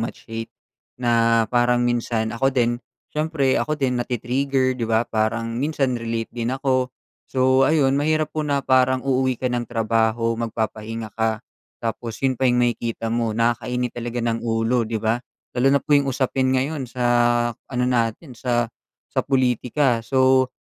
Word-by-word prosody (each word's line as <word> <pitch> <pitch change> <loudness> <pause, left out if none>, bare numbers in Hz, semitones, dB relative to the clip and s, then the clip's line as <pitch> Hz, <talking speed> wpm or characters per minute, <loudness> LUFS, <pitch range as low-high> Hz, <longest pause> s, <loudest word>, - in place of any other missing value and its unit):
much 115 - -5
hate. 115 0 -6 0.5
Na 115 -2 +3
parang 120 0 +3
minsan 115 -2 0
ako 135 +3 +1
din, 120 -2 +1 0.3
siyempre 150 -3 +1
ako 155 - -1
din, 130 -4 0
nati-trigger, 130 +2 0
di 115 - -1
ba, 115 +1 +2
parang 115 +1 -1
minsan 140 -3 0
relate 115 -1 -3
din 120 -1 -3
ako. 130 -1 0 0.4
So 130 0 +3
ayun, 140 -3 +3
mahirap 155 +1 +1
po 155 - -2
na 140 -2 -1
parang 130 0 +3
uuwi 130 -2 +1
ka - - -10
ng 120 -1 -2
trabaho, 115 0 0
magpapahinga 110 -1 -4
ka, 110 +1 -1 0.4
tapos 115 0 -3
yun 130 - +4
pa 130 - +4
yung 125 0 +3
makikita 115 -1 -2
mo. 115 -2 -1
Nakakainit 120 +1 0
talaga 120 0 -4
ng 115 -1 0
ulo, 115 0 0
di 115 - -1
ba, 110 +3 0 0.3
lalo 125 +2 +2
na 140 +1 +4
po 150 - 0
yung 140 -1 +4
usapin 130 0 0
ngayon 135 0 -2
sa 125 0 -3 0.5
ano 125 +2 -4
natin 125 +3 -1
sa 120 -2 -1 0.4
sa - - +2
pulitika. 125 -1 +1
So 130 +1 +3
120 Hz, 160 wpm, -22 LUFS, 115-130 Hz, 0.5 s, yun